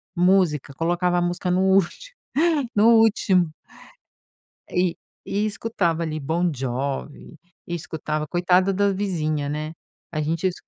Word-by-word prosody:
música, 175 Hz, -6 st, +2 dB
colocava 175 Hz, +3 st, 0 dB
a -, -, +2 dB
música 175 Hz, +1 st, -1 dB
no 185 Hz, +1 st, +2 dB
último, 190 Hz, -, +1 dB, 0.6 s
no 210 Hz, +1 st, +4 dB
último. 195 Hz, -6 st, +3 dB, 1.2 s
E 180 Hz, -1 st, +1 dB, 0.3 s
e 205 Hz, +2 st, 0 dB
escutava 180 Hz, -7 st, -1 dB
ali 155 Hz, -1 st, -3 dB
Bon 165 Hz, +5 st, 0 dB
Jovi 135 Hz, +4 st, -4 dB, 0.3 s
e 175 Hz, -, -4 dB
escutava 155 Hz, -2 st, -3 dB
coitada 180 Hz, +3 st, +2 dB
da 200 Hz, +1 st, +2 dB
vizinha, 155 Hz, -7 st, -1 dB
né, 155 Hz, +2 st, -4 dB, 0.4 s
a 155 Hz, -, -1 dB
gente 165 Hz, +4 st, -1 dB
es 185 Hz, -, +2 dB
175 Hz, 130 wpm, -23 LUFS, 155-190 Hz, 1.2 s, no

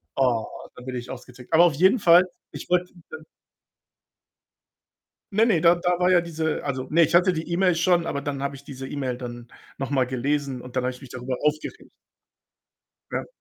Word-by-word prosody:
Oh, 125 Hz, -5 st, +1 dB, 0.3 s
dann 125 Hz, -, -12 dB
bin 130 Hz, -1 st, -5 dB
ich 125 Hz, 0 st, -6 dB
ausgetickt. 125 Hz, 0 st, -11 dB
Aber 165 Hz, +2 st, +6 dB
auf 165 Hz, -, +3 dB
jeden 190 Hz, -, +4 dB
Fall, 175 Hz, -3 st, +6 dB, 0.3 s
ich -, -, -9 dB
wollte 180 Hz, 0 st, +1 dB, 0.2 s
dann 475 Hz, -, -9 dB, 2.1 s
Ne, 215 Hz, +3 st, +4 dB
ne, 185 Hz, -9 st, +2 dB
da 170 Hz, +1 st, +6 dB
da 175 Hz, 0 st, 0 dB
war 180 Hz, 0 st, +2 dB
ja 180 Hz, -1 st, +5 dB
diese 160 Hz, -2 st, -3 dB
also, 130 Hz, -2 st, -3 dB
ne, 165 Hz, +2 st, +4 dB
ich 165 Hz, -, +2 dB
hatte 180 Hz, +1 st, +5 dB
die 165 Hz, +1 st, -5 dB
E-Mail 180 Hz, 0 st, +2 dB
schon, 170 Hz, 0 st, +2 dB
aber 140 Hz, -, -2 dB
dann 140 Hz, -1 st, -4 dB
habe 140 Hz, 0 st, -3 dB
ich 140 Hz, -, -11 dB
diese 135 Hz, -2 st, -8 dB
E-Mail 130 Hz, -4 st, -3 dB
dann 120 Hz, -1 st, -8 dB, 0.3 s
noch 135 Hz, +1 st, -4 dB
mal 130 Hz, -3 st, +2 dB
gelesen 135 Hz, +1 st, -2 dB
und 125 Hz, 0 st, -11 dB
dann 125 Hz, -, +1 dB
habe 130 Hz, -, 0 dB
ich 125 Hz, -, -14 dB
mich 135 Hz, -3 st, -12 dB
darüber 125 Hz, 0 st, -4 dB
aufgeregt. 150 Hz, +1 st, -2 dB, 1.2 s
Ja. -, -, -3 dB
145 Hz, 195 wpm, -24 LUFS, 130-175 Hz, 2.1 s, Aber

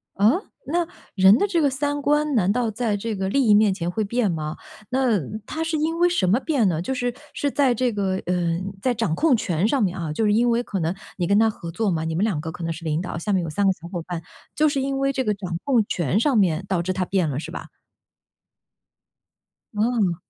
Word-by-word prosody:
啊？ 205 Hz, +2 st, +5 dB, 0.4 s
那， 340 Hz, +2 st, 0 dB, 0.3 s
人 190 Hz, +3 st, +6 dB
的 -, -, +2 dB
这 345 Hz, -4 st, +1 dB
个 285 Hz, -, +3 dB
三 290 Hz, +2 st, -2 dB
观 295 Hz, +1 st, +1 dB
难 195 Hz, -4 st, +3 dB
道 235 Hz, 0 st, 0 dB
在 215 Hz, -1 st, -1 dB
这 220 Hz, +1 st, -3 dB
个 190 Hz, 0 st, -2 dB
利 275 Hz, +5 st, +2 dB
益 210 Hz, -, +6 dB
面 210 Hz, 0 st, +5 dB
前 175 Hz, -2 st, -3 dB
会 215 Hz, +4 st, -1 dB
变 215 Hz, -2 st, 0 dB
吗？ 155 Hz, -1 st, -3 dB, 0.3 s
那 255 Hz, -5 st, +2 dB, 0.3 s
他 320 Hz, +7 st, -3 dB
是 325 Hz, -1 st, -1 dB
因 320 Hz, +2 st, -1 dB
为 350 Hz, 0 st, +5 dB
什 270 Hz, -, +1 dB
么 205 Hz, +7 st, +3 dB
变 270 Hz, -7 st, +1 dB
呢？ 165 Hz, -3 st, 0 dB
就 265 Hz, -, -2 dB
是 245 Hz, -1 st, -1 dB, 0.2 s
是 285 Hz, -, -1 dB
在 265 Hz, -4 st, +2 dB
这 250 Hz, +1 st, +1 dB
个， 200 Hz, -3 st, -1 dB
呃， 175 Hz, -1 st, 0 dB, 0.2 s
在 255 Hz, -, +1 dB
掌 215 Hz, -7 st, 0 dB
控 285 Hz, -, +3 dB
权 180 Hz, -1 st, 0 dB
上 265 Hz, 0 st, +2 dB
面 185 Hz, -2 st, 0 dB
啊， 165 Hz, -3 st, -3 dB
就 215 Hz, +9 st, 0 dB
是 210 Hz, -, +3 dB
因 240 Hz, +3 st, +3 dB
为 235 Hz, +1 st, +1 dB
可 200 Hz, -5 st, -3 dB
能 165 Hz, +2 st, -1 dB, 0.2 s
你 175 Hz, -2 st, -1 dB
跟 200 Hz, +2 st, +3 dB
他 225 Hz, 0 st, +5 dB
合 170 Hz, -5 st, -7 dB
作 200 Hz, +4 st, -1 dB
嘛， 160 Hz, -2 st, -1 dB
你 160 Hz, 0 st, -2 dB
们 185 Hz, -, +1 dB
2 195 Hz, -9 st, 0 dB
个 160 Hz, -, -5 dB
可 175 Hz, -, -8 dB
能 165 Hz, 0 st, -1 dB
是 165 Hz, +1 st, -10 dB
领 155 Hz, -1 st, 0 dB
导， 180 Hz, -, -5 dB
下 190 Hz, +6 st, -2 dB
面 185 Hz, -2 st, +2 dB
有 165 Hz, -, -4 dB
3 200 Hz, +6 st, 0 dB
个 -, -, +5 dB
小 170 Hz, -1 st, -12 dB
伙 175 Hz, -1 st, -4 dB
伴， 170 Hz, -1 st, -5 dB, 0.3 s
就 310 Hz, -, +3 dB
是 280 Hz, -2 st, -1 dB
因 275 Hz, 0 st, -1 dB
为 275 Hz, 0 st, +1 dB
这 260 Hz, -, 0 dB
个 210 Hz, -, +1 dB
掌 185 Hz, -4 st, -5 dB
控 245 Hz, -6 st, +2 dB
权 170 Hz, +3 st, 0 dB
上 270 Hz, +3 st, +2 dB
面 185 Hz, -4 st, +2 dB
导 185 Hz, -3 st, 0 dB
致 185 Hz, -, -2 dB
他 185 Hz, 0 st, -1 dB
变 180 Hz, -4 st, 0 dB
了 140 Hz, -1 st, -2 dB
是 -, -, -7 dB
吧？ -, -, -7 dB, 2.1 s
嗯。 210 Hz, -4 st, +1 dB
210 Hz, 265 characters per minute, -23 LUFS, 175-255 Hz, 2.1 s, 人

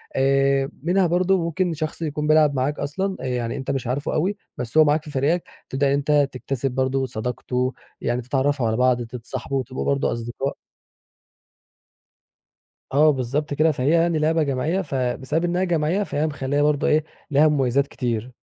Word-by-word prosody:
آآ، 135 Hz, 0 st, +2 dB
منها 180 Hz, +2 st, +3 dB
برضو 185 Hz, +3 st, +2 dB
ممكن 170 Hz, +1 st, 0 dB
شخص 155 Hz, +1 st, -4 dB
يكون 150 Hz, -1 st, -2 dB
بيلعب 155 Hz, -1 st, +5 dB
معاك 135 Hz, +3 st, -1 dB
أصلًا، 190 Hz, +7 st, -2 dB
آآ -, -, -5 dB
يعني 125 Hz, -2 st, -2 dB
أنتَ 135 Hz, -, -3 dB
مش 135 Hz, -3 st, -3 dB
عارفه 135 Hz, +4 st, -2 dB
أوي، 195 Hz, +6 st, 0 dB, 0.2 s
بس 125 Hz, +4 st, -3 dB
هو 155 Hz, -, +9 dB
معاك 150 Hz, +1 st, +2 dB
في 150 Hz, -, -9 dB
فريقك، 150 Hz, +6 st, +1 dB, 0.3 s
تبدأ 140 Hz, +1 st, +1 dB
إن 135 Hz, -, +2 dB
أنتَ 145 Hz, 0 st, +2 dB
تكتسب 130 Hz, +1 st, -3 dB
برضو 130 Hz, +1 st, 0 dB
صداقته، 125 Hz, +2 st, -2 dB, 0.3 s
يعني 120 Hz, +1 st, -1 dB
تتعرفوا 135 Hz, 0 st, 0 dB
على 110 Hz, -, 0 dB
بعض، 125 Hz, -1 st, +3 dB
تتصاحبوا، 130 Hz, +3 st, -4 dB
تبقوا 130 Hz, +1 st, -5 dB
برضو 140 Hz, -1 st, +1 dB
أصدقاء. 120 Hz, +4 st, -3 dB, 2.4 s
آه، 150 Hz, +2 st, +6 dB
بالضبط 140 Hz, +3 st, -2 dB
كده، 155 Hz, +3 st, +3 dB
فهي 135 Hz, -1 st, -1 dB
يعني 165 Hz, 0 st, +3 dB
لعبة 160 Hz, +1 st, +2 dB
جماعية. 150 Hz, +7 st, 0 dB
فبسبب 135 Hz, +2 st, -1 dB
إنها 175 Hz, +1 st, 0 dB
جماعيّة، 175 Hz, +2 st, +1 dB
فهي 155 Hz, -5 st, -1 dB
مخلّية 145 Hz, -1 st, -1 dB
برضو 150 Hz, -1 st, +2 dB
إيه، 155 Hz, 0 st, +3 dB, 0.3 s
ليها 145 Hz, +3 st, +5 dB
مميزات 140 Hz, -2 st, +2 dB
كتير. 120 Hz, -1 st, -3 dB
140 Hz, 165 wpm, -23 LUFS, 130-155 Hz, 2.4 s, هو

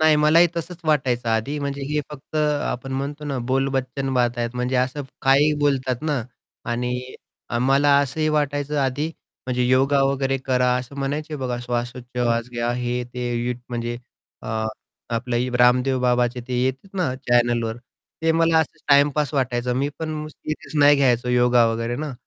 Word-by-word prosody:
नाही 155 Hz, -1 st, +5 dB
मलाही 155 Hz, +3 st, +5 dB
तसंच 170 Hz, +1 st, -4 dB
वाटायचं 130 Hz, -6 st, +1 dB
आधी, 110 Hz, +7 st, 0 dB
म्हणजे 140 Hz, -1 st, -3 dB
हे 150 Hz, 0 st, +1 dB
फक्त 150 Hz, +1 st, -8 dB
आपण 145 Hz, -3 st, -1 dB
म्हणतो 145 Hz, +3 st, -4 dB
ना 140 Hz, -3 st, -2 dB
बोलबच्चन 135 Hz, 0 st, -1 dB
बाता 120 Hz, -1 st, +1 dB
आहेत 120 Hz, +1 st, -2 dB
म्हणजे 125 Hz, +1 st, 0 dB
असं 130 Hz, +3 st, 0 dB, 0.2 s
काहीही 140 Hz, +3 st, +5 dB
बोलतात 130 Hz, -3 st, 0 dB
ना 150 Hz, -6 st, 0 dB, 0.5 s
आणि 125 Hz, +1 st, -3 dB, 0.5 s
मला 140 Hz, +2 st, +4 dB
असंही 155 Hz, +3 st, -1 dB
वाटायचं 145 Hz, -1 st, 0 dB
आधी 135 Hz, +3 st, 0 dB, 0.4 s
म्हणजे 125 Hz, -1 st, 0 dB
योगा 135 Hz, +2 st, +3 dB
वगैरे 135 Hz, 0 st, +1 dB
करा, 125 Hz, -1 st, +1 dB
असं 125 Hz, +2 st, -6 dB
म्हणायचे 150 Hz, +3 st, -3 dB
बघा 125 Hz, -3 st, -3 dB
श्वासोच्छवास 120 Hz, -1 st, -2 dB
घ्या 120 Hz, 0 st, -1 dB
हे 125 Hz, 0 st, -2 dB
ते 125 Hz, -1 st, -2 dB
युथ 125 Hz, -1 st, -1 dB
म्हणजे 120 Hz, -1 st, -3 dB, 0.5 s
अ, 110 Hz, 0 st, -2 dB, 0.5 s
आपलं 125 Hz, +1 st, -1 dB
रामदेव 125 Hz, +2 st, +4 dB
बाबाचे 125 Hz, 0 st, +1 dB
ते 125 Hz, -, -2 dB
येतात 135 Hz, +10 st, -3 dB
ना 160 Hz, -9 st, 0 dB
चॅनलवर 120 Hz, -2 st, +2 dB, 0.5 s
ते 165 Hz, -, +3 dB
मला 165 Hz, 0 st, +3 dB
असंच 160 Hz, -, -2 dB
टाईमपास 145 Hz, +1 st, +4 dB
वाटायचं. 125 Hz, -2 st, 0 dB
मी 140 Hz, +3 st, 0 dB
पण 155 Hz, -1 st, -4 dB
सिरियस 155 Hz, 0 st, -7 dB
नाही 145 Hz, 0 st, +7 dB
घ्यायचं 125 Hz, -3 st, +2 dB
योगा 125 Hz, -1 st, +4 dB
वगैरे 115 Hz, +1 st, -1 dB
ना, 150 Hz, +1 st, -4 dB
130 Hz, 155 wpm, -23 LUFS, 125-145 Hz, 0.5 s, नाही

